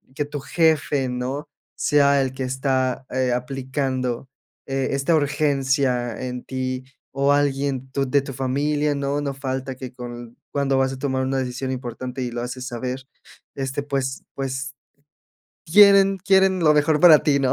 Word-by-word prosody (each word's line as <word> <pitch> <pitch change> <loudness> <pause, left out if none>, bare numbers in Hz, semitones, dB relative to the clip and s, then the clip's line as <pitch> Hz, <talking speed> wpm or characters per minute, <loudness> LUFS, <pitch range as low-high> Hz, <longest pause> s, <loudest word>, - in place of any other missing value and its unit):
que 145 - -1
tu 145 0 -6
jefe, 150 -4 +1
¿no?, 130 +5 -4 0.3
sea 140 -1 +3
el 130 -1 -2
que 130 0 -4
está, 130 0 -1
eh, 130 -1 0
aplicando, 130 0 -2 0.4
eh, 135 -1 -1
esta 140 +4 +1
urgencia 135 -5 +1
en 125 -1 -5
ti 130 -1 -3 0.3
o 140 +1 +2
alguien 140 -2 0
tu 135 0 -1
de 140 +2 +3
tu 135 - -7
familia, 145 +3 0
¿no?, 140 +1 -1
no 140 -1 -2
falta 135 0 -4
que 130 -1 -8
con 120 -1 -9
cuando 140 -1 +1
vas 135 0 +1
a 130 - -8
tomar 130 -1 -1
una 135 0 0
decisión 130 +1 -3
importante 125 +1 -5
y 125 - -2
lo 120 - -4
haces 125 +1 -5
saber, 130 +1 -5 0.5
este, 135 +1 -3
pues 135 -2 -3
pues, 135 0 -4 0.9
quieren 195 +2 +6
quieren 190 0 +3
lo 155 -2 +5
mejor 150 +1 +3
para 160 -3 +8
ti, 145 -2 +3
¿no?, 130 -1 +2
135 Hz, 160 wpm, -23 LUFS, 130-145 Hz, 0.9 s, para